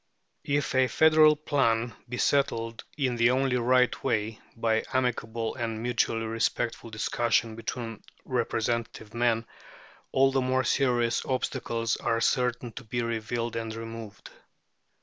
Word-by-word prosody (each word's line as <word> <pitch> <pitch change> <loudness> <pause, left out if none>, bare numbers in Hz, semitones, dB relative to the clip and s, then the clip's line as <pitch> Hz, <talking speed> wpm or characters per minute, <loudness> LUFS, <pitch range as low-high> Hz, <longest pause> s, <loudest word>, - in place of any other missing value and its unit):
If 145 -1 0
a 130 0 +4
federal 155 +1 +6
plan 120 -6 +1 0.2
be 125 - -4
settled 115 -5 0
in 130 -4 0
the 115 +1 +5
only 130 0 +2
right 125 +1 +2
way, 110 0 -1 0.2
by 110 -1 +1
amicable 115 -3 -1
and 115 -2 -3
mutually 115 -1 0
respectful 115 +1 -1
discussion 115 +1 0
between 115 -1 -5 0.2
representative 115 -3 -2
men, 115 -1 +1 0.7
all 135 0 +4
the 135 0 +1
more 130 +1 +1
serious 120 -4 +1
obstacles 115 -3 -1
are 115 - 0
certain 120 0 0
to 130 - -9
be 120 +1 -2
revealed 115 0 -2
and 115 -1 -3
removed. 115 -2 -8
115 Hz, 130 wpm, -28 LUFS, 115-130 Hz, 0.7 s, federal